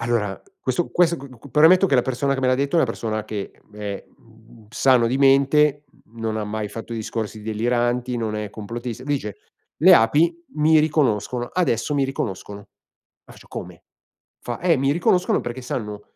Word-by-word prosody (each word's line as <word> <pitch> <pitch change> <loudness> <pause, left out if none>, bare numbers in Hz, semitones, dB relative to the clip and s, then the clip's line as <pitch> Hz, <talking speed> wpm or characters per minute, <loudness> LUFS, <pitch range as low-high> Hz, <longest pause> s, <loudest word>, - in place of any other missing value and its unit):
...allora, 115 -5 -1 0.2
questo 130 +6 -1
questo 170 -1 +3
qu 140 -2 -10
qu 140 - -14
premetto 165 +8 +6
che 145 - +1
la 125 - +4
persona 130 +2 -1
che 135 - -3
me 130 - +1
l'ha 130 - +3
detto 140 +3 -1
è 170 - +5
una - - +4
persona 110 -2 -3
che 105 -2 -5 0.2
è, 105 -1 -6
mhmm, 115 -1 -20
sano 125 -1 +3
di 125 +3 0
mente, 140 +2 +4 0.2
mhmm, 115 +1 -15
non 110 -1 -2
ha 110 - -2
mai 105 0 -4
fatto 115 +2 -8
discorsi 110 -1 -4
deliranti, 120 +3 -1
non 110 -2 -2
è 105 0 -4
complottista, 115 +3 -6
dice: 135 -8 -3 0.4
"Le 185 +3 +8
api 165 +7 +2
mi 155 +1 +4
riconoscono, 125 -6 0
adesso 150 -6 0
mi 140 -1 +2
riconoscono." 105 -6 -5
Ma - - -23
faccio: - - -17
"Come?" - - -8 0.6
Fa: 120 -1 -6
"Eh, 175 -2 +3
mi 135 +1 +1
riconoscono 180 +2 +2
perché 120 +2 -6
sanno 105 -5 -5
120 Hz, 180 wpm, -22 LUFS, 110-145 Hz, 0.6 s, Le